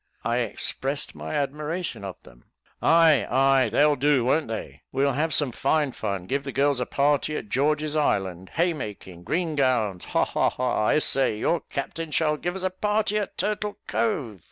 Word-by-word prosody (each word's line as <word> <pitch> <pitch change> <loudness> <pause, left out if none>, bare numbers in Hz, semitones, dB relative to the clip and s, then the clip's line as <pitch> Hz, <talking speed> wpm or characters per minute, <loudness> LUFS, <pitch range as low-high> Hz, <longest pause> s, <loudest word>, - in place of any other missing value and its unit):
I 120 +1 0
expressed 135 +4 -3
my - - -6
admiration 150 - -3
of 95 -2 -5
them. - - -18 0.4
"Ay, 165 -3 +5
ay, 135 0 +4
they'll 150 0 +4
do, 140 -2 +2
won't 150 +5 +2
they? 80 -10 -6
we'll 140 +1 +2
have 155 +5 0
some 145 -3 +2
fine 140 +3 +1
fun 100 -6 -4
give 140 +8 -1
the 135 - -5
girls 140 0 +2
a 125 - -2
party 145 +1 +1
at 105 - -7
George's 150 +4 +1
Island 95 - 0
haymaking 110 - -2
green 165 - -1
gowns 120 -10 +1
ha, - - +1
ha, - - +1
ha. 125 -4 -1
I - - +4
say, 135 -7 +1
your 170 +9 +1
captain 155 +3 -4
shall 150 0 +1
give 175 +4 -3
us 190 - -4
a 185 - 0
party 210 +2 0
at 205 - -5
Turtle 210 0 -2
Cove. 130 - -1
140 Hz, 180 wpm, -25 LUFS, 120-155 Hz, 0.4 s, Ay